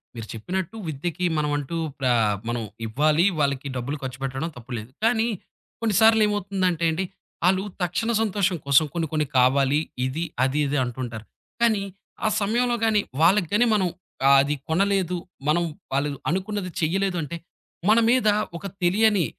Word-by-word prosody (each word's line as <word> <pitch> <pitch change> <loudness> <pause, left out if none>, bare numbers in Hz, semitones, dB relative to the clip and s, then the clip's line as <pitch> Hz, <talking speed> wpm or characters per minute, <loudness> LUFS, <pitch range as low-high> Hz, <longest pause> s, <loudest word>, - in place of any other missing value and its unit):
మీరు 115 -2 -7
చెప్పినట్టు 180 - -4
విద్యకి 165 +4 -3
మనమంటూ 145 +1 -1 0.2
ప్ర 135 - -2 0.4
మనం 120 0 -1 0.2
ఇవ్వాలి, 150 +9 +2
వాళ్ళకి 140 -1 0
డబ్బులు 130 +4 -3
ఖర్చుపెట్టడం 135 +4 -4
తప్పు 125 +1 -12
లేదు. 110 +1 -8
కానీ, 225 0 +3 0.5
కొన్నిసార్లేమవుతుందంటే 205 -5 +3
అండి 175 +4 -1 0.4
ఆళ్ళు 190 +1 +3 0.2
తక్షణ 180 +7 0
సంతోషం 200 -4 +1
కోసం 140 +2 +5
కొన్ని 165 -2 -1
కొన్ని 155 -1 +1
కావాలి 135 +3 +4 0.3
ఇది, 140 +6 -2 0.2
అది, 135 +3 +1
ఇది 145 +1 0
అంటుంటారు. 120 -3 -5 0.4
కానీ 220 -4 +3 0.4
ఆ - - +4
సమయంలో 240 +4 +1
గాని 215 -2 +3 0.2
వాళ్ళకి 180 +2 +4
గాని 235 +4 +4
మనం 190 -3 +2 0.4
ఆహ్, 140 - +8
అది 145 +2 0
కొనలేదు 185 +1 +1 0.3
మనం 175 +3 +3 0.3
వాళ్ళు 140 0 0
అనుకున్నది 190 0 -2
చెయలేదు 180 +2 0
అంటే, 160 +3 -5 0.5
మన 225 - +6
మీద 245 -2 +3 0.3
ఒక - - -11 0.2
తెలియని 205 0 +3
170 Hz, 140 wpm, -24 LUFS, 140-200 Hz, 0.5 s, ఆహ్